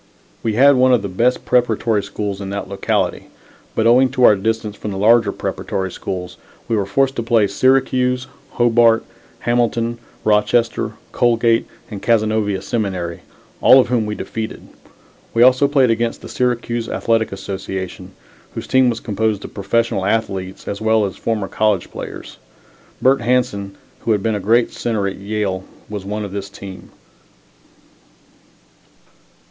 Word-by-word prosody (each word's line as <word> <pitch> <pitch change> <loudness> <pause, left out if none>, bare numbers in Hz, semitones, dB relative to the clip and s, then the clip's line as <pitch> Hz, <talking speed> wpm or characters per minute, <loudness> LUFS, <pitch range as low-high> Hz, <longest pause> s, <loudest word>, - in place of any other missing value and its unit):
We 110 - -1
had 135 +4 +6
one 130 0 +4
of 110 - -2
the - - -2
best 115 +7 0
preparatory 115 -3 +2
school 100 +1 -4
teams 100 - -9
in 95 - -5
that 100 +1 -4
locality, 100 0 -1 0.5
but 110 - +1
owing 125 +3 +5
to 125 - +1
our 105 - +8
distance 110 +1 -2
from 105 - -6
the 95 - -4
larger 110 +1 +4
preparatory 95 -1 -3
schools, 90 0 -6 0.3
we 115 - 0
were 100 -2 -1
forced 135 +6 +1
to - - 0
play 115 -2 +3
Syracuse, 125 +3 +2 0.3
Hobart, 115 -1 +4 0.4
Hamilton, 120 -1 0 0.2
Rochester, 110 +2 +1 0.2
Colgate, 115 -1 +2 0.2
and 100 -2 -6
Cazenovia 110 -3 +1
Seminary 95 -6 -3 0.4
all 130 - +8
of 125 - +2
whom 115 -4 +1
we 105 - -3
defeated. 110 +1 -6 0.7
We 115 - +6
also 130 +3 +5
played 135 -4 +3
against 115 +1 -1
the - - -8
Syracuse 120 -2 -1
Athletic 115 -1 0
Association, 95 -1 -6 0.4
whose - - -5
team 130 -1 +3
was 115 -1 -2
composed 110 -2 -1
of - - -10
professional 105 -1 0
athletes 100 -4 -2
as 100 +1 -4
well 110 -1 +3
as 95 - -5
former 110 -4 -2
college 105 -4 0
players. - - -8 0.7
Bert 135 +1 +4
Hanson, 115 -6 0 0.2
who 115 - +1
had 100 -2 -1
been 115 - +1
a 105 - -1
great 115 +5 +2
center 110 -4 -2
at 95 - -4
Yale, 100 -2 -2 0.3
was 105 -2 -6
one 105 +1 -3
of 100 - -8
this 100 0 -5
team. 95 -1 -10
110 Hz, 155 wpm, -19 LUFS, 100-120 Hz, 0.7 s, our